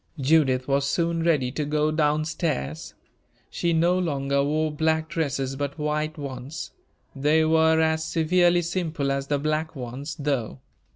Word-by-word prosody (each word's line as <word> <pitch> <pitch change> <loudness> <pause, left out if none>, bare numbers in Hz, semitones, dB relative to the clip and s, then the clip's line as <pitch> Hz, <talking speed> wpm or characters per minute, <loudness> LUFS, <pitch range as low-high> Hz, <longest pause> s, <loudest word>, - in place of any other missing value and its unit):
Judith 135 -3 +3
was 140 0 +1
soon 170 +2 0
ready 150 -7 +1
to 150 +3 -2
go 150 +1 +1
down 155 0 +1
stairs. 80 - -3 0.6
She 170 - 0
no 170 +3 +3
longer 140 -5 0
wore 155 +2 0
black 160 +1 0
dresses, 135 -4 -2
but 140 +1 -4
white 150 +1 -2
ones. 135 0 -6 0.4
They 150 +3 +3
were 160 0 +4
as 160 0 +1
severely 175 +2 +2
simple 165 -5 -2
as 135 0 -2
the 145 - +1
black 155 +2 -2
ones, 135 +4 -6
though. 135 - -2
150 Hz, 150 wpm, -25 LUFS, 140-160 Hz, 0.6 s, were